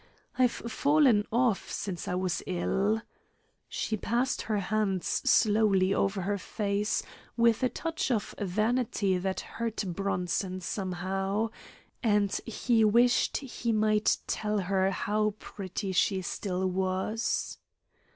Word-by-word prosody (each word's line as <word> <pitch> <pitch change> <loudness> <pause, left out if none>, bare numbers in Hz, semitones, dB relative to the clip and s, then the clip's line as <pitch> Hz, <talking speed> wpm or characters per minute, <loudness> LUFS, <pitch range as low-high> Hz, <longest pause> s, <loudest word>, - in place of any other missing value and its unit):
"I've 255 -1 +4
fallen 255 -2 +2
off 235 -3 +1
since 185 -4 -4
I 180 - -1
was 185 -1 -1
ill." 195 +4 0 0.7
She 220 - -2
passed 240 +5 0
her 215 -1 -1
hands 200 -2 0 0.2
slowly 210 -6 +4
over 195 0 0
her 200 +2 -1
face, 205 +1 -1 0.3
with 235 -1 +4
a 255 - +2
touch 325 +1 -3
of 225 -5 -1
vanity 210 -1 0
that 190 +1 -2
hurt 230 -2 -4
Bronson 185 0 -2
somehow, 195 +3 -2 0.5
and 205 -3 +2 0.2
he 230 0 +2
wished 235 +3 +4
he 240 -3 -3
might 215 -1 +3
tell 210 0 -1
her 190 +1 +1
how 210 +1 0
pretty 195 -1 -5
she 190 +1 +1
still 185 0 -2
was. 190 +4 -1
205 Hz, 120 wpm, -29 LUFS, 190-225 Hz, 0.7 s, I've